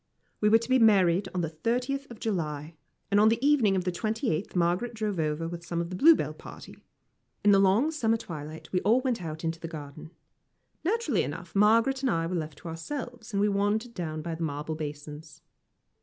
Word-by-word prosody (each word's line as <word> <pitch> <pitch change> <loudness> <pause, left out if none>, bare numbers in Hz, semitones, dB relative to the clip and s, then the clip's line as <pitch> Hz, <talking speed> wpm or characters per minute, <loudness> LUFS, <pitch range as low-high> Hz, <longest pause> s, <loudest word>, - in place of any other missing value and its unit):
We 210 - +3
were 225 - +7
to 230 - -6
be 260 0 +4
married 195 -5 +4
on 180 - -2
the 165 - -2
thirtieth 250 - -2
of 235 - -11
July, 155 -7 -3 0.4
and 205 - +4
on 215 +1 +6
the 225 - +2
evening 255 -10 +4
of 185 - 0
the 180 - -1
twenty 220 +7 -1
eighth 165 +6 -3
Margaret 180 +7 0
drove 210 -4 -2
over 155 +1 -1
with 170 0 -7
some 170 0 -3
of 170 +1 -3
the - - -4
Bluebell 320 - +5
party. - - -12 0.6
In 205 - +7
the 195 - +6
long 200 +10 +3
summer 230 -8 +1
twilight 155 -6 -8
we 180 - +1
all 230 +6 +3
went 250 -5 -1
out 160 -1 -6
into 165 0 -2
the 165 - -6
garden. 150 -1 -9 0.7
Naturally 355 - +1
enough, 170 +6 -6
Margaret 230 +6 +4
and 270 - +1
I 165 -6 0
were 170 - -3
left 155 -4 -4
to 170 - -10
ourselves, 240 - -6
and 200 - -1
we 205 - +3
wandered 205 +4 0
down 155 -5 -4
by 170 - -4
the 160 - -7
marble 150 0 -3
basins. 150 0 -8
190 Hz, 210 wpm, -28 LUFS, 165-225 Hz, 0.7 s, were